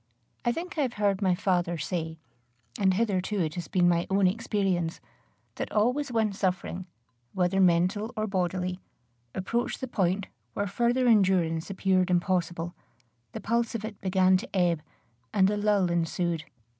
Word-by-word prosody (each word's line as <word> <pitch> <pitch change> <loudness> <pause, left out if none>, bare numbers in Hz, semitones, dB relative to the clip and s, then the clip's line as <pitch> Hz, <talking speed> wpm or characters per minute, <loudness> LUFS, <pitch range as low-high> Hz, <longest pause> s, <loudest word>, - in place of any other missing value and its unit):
I 240 - +2
think 340 +5 -5
I - - +4
have 255 -4 0
heard 200 -2 +1
my 185 -2 +3
father 175 -2 0
say, 160 +1 -3 0.6
and 190 -2 +3
hitherto 200 -1 0
it 155 -4 0
has 175 -2 -5
been 180 -2 +3
my 170 -1 +2
own 195 0 +3
experience, 190 -4 0 0.6
that - - -4
always 250 +6 +1
when 220 -3 +1
suffering, 185 -1 -2 0.5
whether 185 +1 +2
mental 185 +5 +2
or 215 - 0
bodily, 185 -2 -1 0.6
approached 235 +6 -1
the 260 - -4
point 190 -3 0 0.3
where 205 - -1
further 240 +5 +1
endurance 185 -7 +3
appeared 190 -1 +1
impossible, 175 -1 0 0.6
the - - -5
pulse 235 +1 0
of 215 -1 -3
it 215 -2 -8
began 185 0 +4
to 250 +8 -7
ebb, 175 -4 +2 0.5
and 195 0 +4
a - - 0
lull 205 -4 +2
ensued. 170 -1 -1
190 Hz, 155 wpm, -28 LUFS, 175-210 Hz, 0.6 s, I